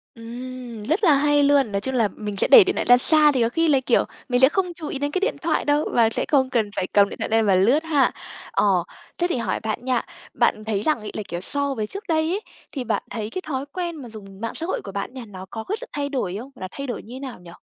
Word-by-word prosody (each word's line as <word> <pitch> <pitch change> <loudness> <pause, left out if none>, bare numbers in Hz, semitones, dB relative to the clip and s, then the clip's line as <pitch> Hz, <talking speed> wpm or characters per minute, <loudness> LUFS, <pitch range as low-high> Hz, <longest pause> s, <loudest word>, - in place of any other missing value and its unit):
Ừm, 240 -1 -8
rất 325 - 0
là 325 -6 +6
hay 290 +1 +3
luôn. 280 -6 +3
Nói 200 0 -1
chung 265 - -3
là 225 -4 +3
mình 210 -2 -5
sẽ - - +2
để 460 - +10
điện 380 - -1
thoại - - -1
ra 245 0 +7
xa 300 +2 +5
thì 255 -3 0
có 230 - +2
khi 330 +6 +1
là, 280 -3 +4
kiểu, 250 -2 +2 0.3
mình 245 - +2
sẽ 265 - +8
không 360 0 -1
chú 315 -3 -7
ý 275 - -4
đến 285 0 -1
cái 370 - 0
điện 430 +5 0
thoại 325 -1 0
đâu 295 +1 +2
và 230 -2 +4
sẽ - - -2
không 265 -3 +3
cần 225 -5 0
phải 185 - -1
cầm 200 -1 +4
điện - - -9
thoại - - -3
lên 225 0 +3
mà 195 -2 +4
lướt 245 - +3
ha. 295 -4 +2 0.4
Ờ, 190 -4 +2 0.3
thế 350 - +1
thì 265 - 0
hỏi 215 -5 -1
bạn 220 +3 -4
nha, 255 -2 +1 0.3
bạn 215 - +1
thấy 215 -2 -1
rằng 305 -6 +1
ấy, 210 - -7
là, 215 - -4
kiểu, 175 +1 -5
so 280 +6 0
với 215 -3 -2
trước 395 - -8
đây 320 -1 +1
ấy, 405 +3 -1 0.3
thì 265 -4 -4
bạn - - -1
thấy 220 -2 -4
cái 370 - -5
thói 270 -2 -3
quen 345 -2 -3
mà 255 -6 -9
dùng 200 -2 -11
mạng 230 - -4
xã 325 - -2
hội 370 - -2
của 195 - -7
bạn 200 +4 -4
nha, 255 -3 -8
nó 190 -3 -10
có 220 - -6
cái 420 - -3
sự - - -6
thay 285 -1 -2
đổi 200 -10 -2
không? 255 +4 -9
Gọi - - -16
là 185 - -3
thay 275 -1 -6
đổi 245 - -4
như 235 +3 -10
thế 260 - -7
nào 265 -6 -7
nhỉ? 175 -1 -13
255 Hz, 300 wpm, -23 LUFS, 215-295 Hz, 0.4 s, để